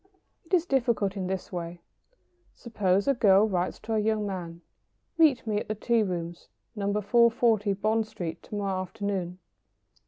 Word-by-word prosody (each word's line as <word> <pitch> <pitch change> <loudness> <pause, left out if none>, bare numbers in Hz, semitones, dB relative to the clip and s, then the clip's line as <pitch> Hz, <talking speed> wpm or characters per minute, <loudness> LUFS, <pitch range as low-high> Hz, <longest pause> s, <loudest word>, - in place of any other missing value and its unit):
It 325 - -16
is 345 -2 +1
difficult 235 - 0
in 190 -2 -3
this 190 -1 -4
way. 175 -1 -5 0.8
Suppose 200 -3 0
a 275 - +4
girl 210 -3 +4
writes 180 -3 -1
to 225 +1 -4
a 220 - +2
young 215 0 0
man: 175 -4 -6 0.6
"Meet 305 -8 +4
me 210 -2 0
at - - -7
the 215 - -2
tea 230 +2 +1
rooms, 175 -4 -4 0.3
No. 200 -1 -1
440, 220 0 +3
Bond 215 +2 0
Street, 175 -6 -6
to - - -9
morrow 195 -2 -1
afternoon." 185 -2 -4
205 Hz, 160 wpm, -27 LUFS, 185-220 Hz, 0.8 s, a